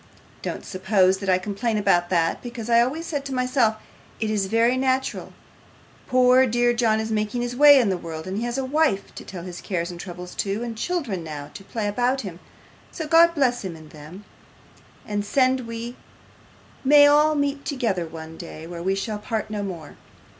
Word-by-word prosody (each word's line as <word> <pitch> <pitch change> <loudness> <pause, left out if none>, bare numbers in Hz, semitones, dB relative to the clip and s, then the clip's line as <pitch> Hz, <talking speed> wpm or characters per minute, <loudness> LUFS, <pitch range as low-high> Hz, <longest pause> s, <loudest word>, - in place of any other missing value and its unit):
Don't - - -5
suppose 190 0 +2
that 195 - -3
I 185 - +5
complain 210 +4 -2
about 175 -4 +2
that, 165 -2 +1
because 235 -1 -6
I 235 0 +6
always 295 +7 -1
said 290 -4 -3
to 275 - -4
myself, 250 -3 +2 0.4
"It 220 -1 -1
is 200 -3 0
very 230 +4 +3
natural; 260 0 -1 0.8
poor 255 0 +5
dear 240 +1 +2
John 230 -2 +2
is 220 0 -3
making 215 +3 -1
his 245 0 -4
way 290 +1 +8
in 230 -5 +2
the 185 -2 -1
world, 160 -1 -7
and 195 +3 -3
has 240 +2 -2
a 265 - -1
wife 280 -7 0
to - - -9
tell 180 -3 -8
his 180 -1 -8
cares 175 -2 -3
and 175 - -9
troubles 180 0 -8
to, 205 +3 -3
and 235 -1 -5
children 235 - -2
now 150 -2 -7
to 195 - -10
play 210 +1 -3
about 245 +5 0
him, 180 -5 -8 0.5
so 320 - -5
God 335 +1 +5
bless 250 -5 +1
him 185 -4 -5
and 155 -1 -14
them, 155 +7 -12 0.8
and 205 -1 -2
send 255 +2 +1
we 230 +1 -6 0.9
may 290 +2 +7
all 300 +1 +5
meet 285 -1 -1
together 225 - -1
one 160 0 -9
day 160 -2 -9
where 170 0 -7
we 190 +2 0
shall 210 +2 -3
part 215 0 -4
no 210 -1 -3
more." 175 -7 -7
220 Hz, 195 wpm, -23 LUFS, 185-255 Hz, 0.9 s, way